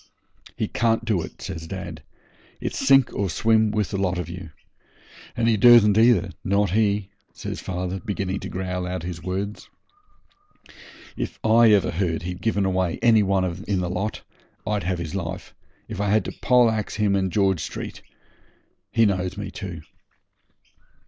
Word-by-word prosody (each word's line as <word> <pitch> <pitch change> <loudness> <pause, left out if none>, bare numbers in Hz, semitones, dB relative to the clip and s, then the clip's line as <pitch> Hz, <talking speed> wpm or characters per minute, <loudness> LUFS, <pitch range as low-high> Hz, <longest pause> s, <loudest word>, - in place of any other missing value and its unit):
'He - - -1
can't 115 -1 0
do 105 -6 +1
it,' - - -9
says 80 -4 -6
dad; 85 -5 -7 0.6
'it's - - -4
sink 135 -2 +4
or 100 -1 -1
swim 110 +4 +3
with 105 -1 -1
the 100 - -2
lot 90 -2 0
of 90 - -4
you. 85 0 -8 0.9
And 115 -1 +1
he 115 -2 +3
dursn't 105 -2 +7
either, 110 -5 +4
not 100 -1 +1
he,' 100 -1 +1 0.2
says - - -5
father, 90 +1 -3
beginning 95 0 -3
to - - -7
growl 90 -1 -3
out 90 -1 -4
his 85 -1 -6
words. 95 +4 -4 1.5
'If - - -4
I 115 +1 +6
ever 100 -5 +3
heard 85 -2 -1
he'd 90 +1 -5
given 100 -2 +1
away 95 -2 0
any 115 -2 +6
one 95 -2 +1 0.2
in 100 -3 0
the 90 -1 -2
lot 100 +4 -3 0.4
I'd 105 -3 -1
have 90 0 0
his 85 -3 -5
life, 95 -1 -5 0.3
if 105 -3 -5
I 100 - 0
had 110 +2 +2
to - - -4
poleaxe 115 -4 +3
him 105 -2 +2
in 95 -1 +1
George 95 -1 +2
Street. - - -6 0.9
He 115 - +4
knows 95 -2 -1
me 105 -1 -5
too.' 90 -7 -7
95 Hz, 165 wpm, -24 LUFS, 90-105 Hz, 1.5 s, dursn't